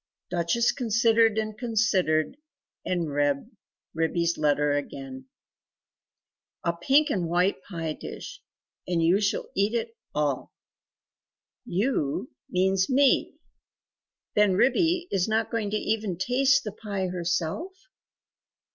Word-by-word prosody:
Duchess 180 +7 +2
considered 230 -2 +3
and 215 -1 -2
considered 205 -7 +1 0.5
and 170 -4 -1
read 145 - 0 0.4
Ribby' 165 +1 0
s 170 0 +1
letter 150 -1 +2
again 135 -2 -5 1.4
"A 170 - +1
pink 275 - +3
and 175 -4 -1
white 180 +3 +1
pie 165 -4 -4
dish - - -9 0.5
and 170 -2 +1
YOU 180 +5 +3
shall 205 +1 -1
eat 200 +4 +1
it 230 0 -2 0.2
all. 145 -3 -1 1.1
'You' 175 - -1 0.2
means 190 +1 +2
me 275 0 +3 1.0
then 210 -2 +4
Ribby 335 - +2
is 185 -2 +1
not 220 0 0
going 220 -3 -1
to 215 - 0
even 215 -5 -1
taste 265 +7 +3
the 210 - -4
pie 200 -2 -4
herself? 180 - -2
195 Hz, 115 wpm, -26 LUFS, 165-225 Hz, 1.4 s, then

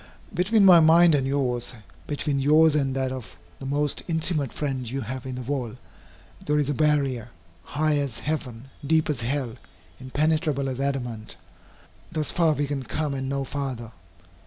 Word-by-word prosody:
Between 195 +4 +3
my 180 -3 +9
mind 165 +1 +6
and 135 -2 +2
yours, 125 -3 -1 0.3
between 145 -1 -1
yours 155 +3 +5
and 135 -3 0
that 130 -1 -1
of 115 -9 -8 0.2
the 135 - -6
most 145 +1 0
intimate 160 -5 0
friend 130 -5 -3
you 135 +3 -3
have 130 +3 -6
in 130 - -4
the 125 - -5
world, 125 -2 -3 0.7
there 150 0 +1
is 145 -1 +1
a - - 0
barrier, 140 -6 +1 0.3
high 150 - 0
as 140 -5 -2
heaven, 135 -4 -4
deep 155 +1 +2
as 130 -5 -3
hell, 125 -1 -2 0.4
impenetrable 145 +1 0
as 130 0 -4
adamant. 125 -6 -3 0.7
Thus 155 -3 -1
far 165 -3 +2
can 145 -1 -1
we 130 - -8
come 150 +1 -2
and 135 -1 -3
no 140 0 -1
farther. 130 -4 -5
140 Hz, 165 wpm, -25 LUFS, 130-150 Hz, 0.7 s, my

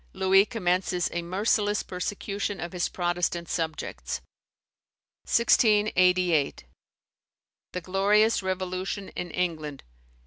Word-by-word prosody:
Louis 190 +1 +4
commences 180 -3 0
a 175 - -1
merciless 205 +3 0
persecution 200 +2 -4
of 175 - -5
his 180 -1 -1
Protestant 175 -1 -1
subjects. 150 - -3 1.1
1688. 185 - +3 1.1
The 180 - -3
glorious 205 +5 +3
Revolution 185 +1 -3
in 180 - -5
England. 155 -5 -3
185 Hz, 90 wpm, -27 LUFS, 175-200 Hz, 1.1 s, Louis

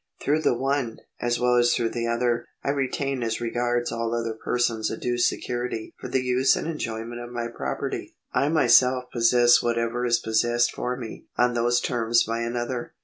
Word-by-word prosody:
Through 150 +2 +1
the 120 - +2
one, 135 -3 -1 0.2
as 120 0 0
well 125 0 +3
as 120 0 +4
through 115 -1 0
the 115 -1 -2
other, 120 0 0 0.2
I 140 - +1
retain 135 -1 -2
as 115 -1 -1
regards 120 +1 -1
all 115 0 -2
other 115 -1 -2
persons 115 -1 -1
a - - -4
due 120 0 -2
security 120 -2 -2
for - - -6
the 130 - 0
use 125 +1 +3
and - - -3
enjoyment 120 -6 -4
of 120 - -7
my 120 -1 -3
property, 115 - -4 0.2
I 140 - +2
myself 130 -5 +4
possess 120 0 +5
whatever 115 0 -1
is 120 -1 +3
possessed 120 +2 +1
for 125 0 -3
me 115 -3 -8
on 125 0 +3
those 120 +1 +2
terms 120 -2 +2
by 115 +1 -2
another. 120 +1 -3
120 Hz, 185 wpm, -25 LUFS, 115-125 Hz, 0.2 s, possess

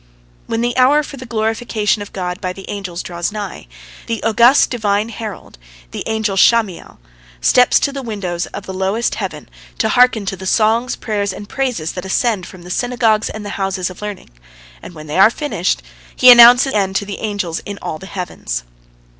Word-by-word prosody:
When 225 0 -1
the 240 0 -1
hour 280 +4 +4
for 280 - -9
the 255 -1 -9
glorification 220 -1 -1
of 205 - -8
God 180 0 -4
by 185 -2 -3
the 195 +1 -11
angels 190 -4 -5
draws 175 +2 -3
nigh, 205 - -7 0.4
the 230 -1 -3
august 235 +5 +4
Divine 215 -2 0
herald, 215 - -8 0.3
the - - -6
angel 220 -3 -1
Sham'iel, 215 -2 +2 0.4
steps 250 - +4
to 280 - +1
the 275 0 -5
windows 190 -7 -4
of 200 - -8
the 190 - -6
lowest 190 +5 -1
heaven - - -5 0.3
to 220 - +1
hearken 245 -3 +3
to 195 - -3
the 190 0 -8
songs, 225 +4 +2
prayers, 205 -3 -2
and 205 +2 -9
praises 245 -13 -2
that 180 - -6
ascend 195 -1 0
from 180 -1 -13
the 180 - -9
synagogues 235 -2 +1
and 215 -1 -7
the - - -5
houses 190 -1 -2
of 185 - -13
learning, 210 - -7 0.5
and 175 - -11
when 155 -1 -10
they 155 +4 -2
are 195 +3 +8
finished, 205 - -2 0.3
he 255 - +8
announces 245 +2 +8
the 210 - +2
end 190 -1 -1
to 200 - 0
the 200 0 -6
angels 200 -6 -3
in 200 0 -8
all 155 - -5
the 190 - -10
heavens. 175 - -5
210 Hz, 195 wpm, -17 LUFS, 190-235 Hz, 0.5 s, are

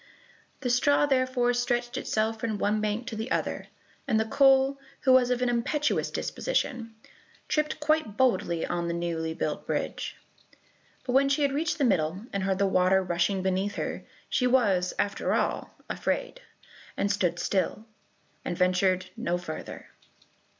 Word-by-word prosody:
The 250 -3 0
straw 285 +4 +4
therefore 255 -3 +2
stretched 245 0 -1
itself 220 +1 -1
from 220 -2 -2
one 210 +1 +1
bank 215 +3 -1
to 240 -2 -5
the 220 +3 -4
other, - - -2 0.4
and 220 - +2
the 220 - +1
coal, 270 +3 +4 0.2
who 260 - +4
was 255 -1 +5
of 250 0 +1
an - - +2
impetuous 285 +5 0
disposition, 245 - -2 0.5
tripped 305 0 0
quite 300 -8 0
boldly 230 -10 +1
on 175 0 -2
to - - -2
the 170 - -1
newly 165 -2 -2
built - - -3
bridge. - - -3 0.9
But 250 -1 -3
when 275 +1 +4
she 280 +2 +2
had 280 - +2
reached 320 +5 -1
the 290 - 0
middle, 185 -3 +1
and 200 - -1
heard 190 0 0
the 200 - +2
water 190 0 +3
rushing 180 +2 0
beneath 190 +2 0
her, - - -4 0.2
she 250 - +1
was, 205 -8 +2
after 200 0 0
all, - - -1 0.2
afraid, - - -2 0.6
and 200 - +1
stood 180 -4 0
still, 200 +4 -1 0.6
and 175 - -3
ventured 185 0 +2
no 175 +1 -1
farther. 165 -3 -8
220 Hz, 160 wpm, -27 LUFS, 185-260 Hz, 0.9 s, was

